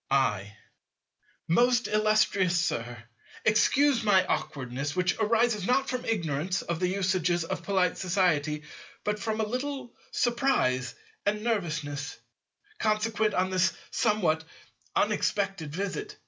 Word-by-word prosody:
I. 105 -6 +1 0.9
Most 245 +7 +3
illustrious 210 -4 +2
Sir, 120 -7 -2 0.4
excuse 260 +4 +4
my 190 -3 +4
awkwardness, 140 -2 -3
which 180 0 +1
arises 220 -2 +2
not 270 +2 +2
from 255 -1 -3
ignorance 170 -3 -1
of 170 -1 -3
the 180 - +1
usages 180 -2 +1
of 165 - -4
polite 185 -1 +1
society, 165 -5 +1 0.4
but 210 0 -1
from 220 +1 -2
a 220 - +1
little 255 +1 -4 0.2
surprise 235 - +1 0.3
and 210 +1 0
nervousness, 155 -10 -2 0.6
consequent 215 0 +1
on 185 +1 +1
this 185 0 +2 0.2
somewhat 195 -9 +1 0.5
unexpected 195 -7 0
visit. 415 - -4
190 Hz, 115 wpm, -28 LUFS, 160-220 Hz, 0.9 s, excuse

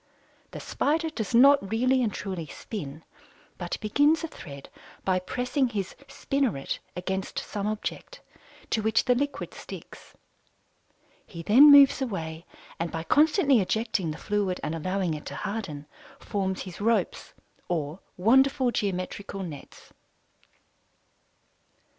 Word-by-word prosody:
The - - -8
Spider 320 +2 0
does 230 -5 -3
not 275 -4 +6
really 255 +4 +2
and 225 -4 +1
truly 185 -6 -5
"spin," 155 -4 -7 0.6
but - - -3
begins 290 +10 +3
a - - -1
thread 140 - -10 0.4
by 185 -1 +2
pressing 250 +7 -1
his 200 -5 -3
"spinneret" 270 - -1 0.2
against 190 +2 -3
some 205 -1 -3
object, 215 - -5 0.5
to 220 - +1
which 220 +1 +2
the 250 - +4
liquid 285 +3 -3
sticks. - - -11 1.1
He 170 -2 -8
then 260 - +8
moves 280 -1 +8
away 165 -9 -4 0.3
and 165 0 -2
by 165 -1 -4
constantly 295 - +4
ejecting 210 -2 0
the 155 - -5
fluid 205 -3 -1
and 155 - -2
allowing 185 +1 -1
it 150 - -7
to - - -6
harden, 195 -9 -4 0.3
forms 190 -2 -2
his 185 0 -9
ropes 230 +2 0 0.3
or 160 -1 -2 0.2
wonderful 260 +5 +4
geometrical 195 -1 -3
nets. 150 -6 -10
205 Hz, 125 wpm, -27 LUFS, 180-255 Hz, 1.1 s, then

